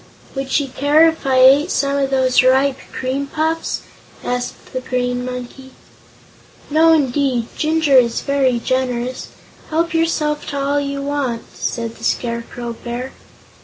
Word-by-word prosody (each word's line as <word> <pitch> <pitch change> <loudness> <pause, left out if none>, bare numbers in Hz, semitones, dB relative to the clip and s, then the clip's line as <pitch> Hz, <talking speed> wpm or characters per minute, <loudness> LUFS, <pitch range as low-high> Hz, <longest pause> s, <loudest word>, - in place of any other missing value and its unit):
"Would 270 -1 -4
she 285 +1 +1
care 290 +5 +4
if 320 -3 -2
I 265 - +2
ate 275 +6 +6
some 280 -4 0
of 275 -1 0
those 260 -1 +3
ripe 265 +1 +3
cream 265 +2 -3
puffs?" 320 +3 -2 0.4
asked 245 0 -4
the 255 - -1
Green 245 -1 -2
Monkey. 255 +1 -7 1.0
"No, 320 +2 +5
indeed; 270 -5 +1
Jinjur 310 -3 +3
is 235 -2 0
very 275 -3 +1
generous. 250 0 -2 0.4
Help 330 +2 0
yourself 315 -2 0
to 280 - -3
all 280 +1 +1
you 280 0 -3
want," 280 -5 -2
said 230 -1 -4
the - - -15
Scarecrow 235 0 -3
Bear. 245 +2 -5
270 Hz, 140 wpm, -19 LUFS, 250-290 Hz, 1.0 s, ate